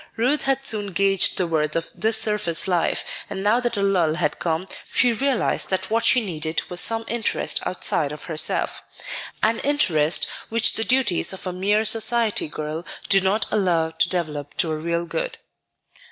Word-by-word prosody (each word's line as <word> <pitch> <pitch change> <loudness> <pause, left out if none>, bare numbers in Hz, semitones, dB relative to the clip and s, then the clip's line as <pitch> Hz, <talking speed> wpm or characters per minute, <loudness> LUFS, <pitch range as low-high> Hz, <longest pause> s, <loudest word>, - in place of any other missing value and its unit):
Ruth 255 +6 +1
had 270 0 0
soon 205 -5 -1
gauged 195 +1 +2
the 185 - +2
worth 155 -2 0
of 165 0 -2
this 220 +5 0
surface 210 -7 +1
life, 175 -3 0 0.2
and 195 -1 -4
now 215 +4 +3
that 240 -3 -1
a 200 - 0
lull 175 -6 +2
had 155 -3 -1
come, 165 +2 -1 0.2
she 245 -1 +4
realized 265 +1 0
that 190 +1 -2
what 230 +1 +1
she 250 -4 +3
needed 160 -3 -3
was 175 - +3
some 225 0 +1
interest 235 -1 -1
outside 155 -5 -1
of 150 - -8
herself, 155 -2 -1 0.6
an 225 +2 +2
interest 170 - +2 0.2
which 225 0 +2
the 225 - 0
duties 240 -9 +2
of 190 - -9
a 185 - -3
mere 205 +4 +1
society 225 -2 +3
girl 155 +2 -5 0.3
do 195 -1 +5
not 195 +4 +1
allow 170 -5 +1
to 165 +1 +1
develop 150 -5 -3
to 165 - +2
a - - -1
real 170 +2 -2
good. - - -3
190 Hz, 180 wpm, -23 LUFS, 165-225 Hz, 0.6 s, do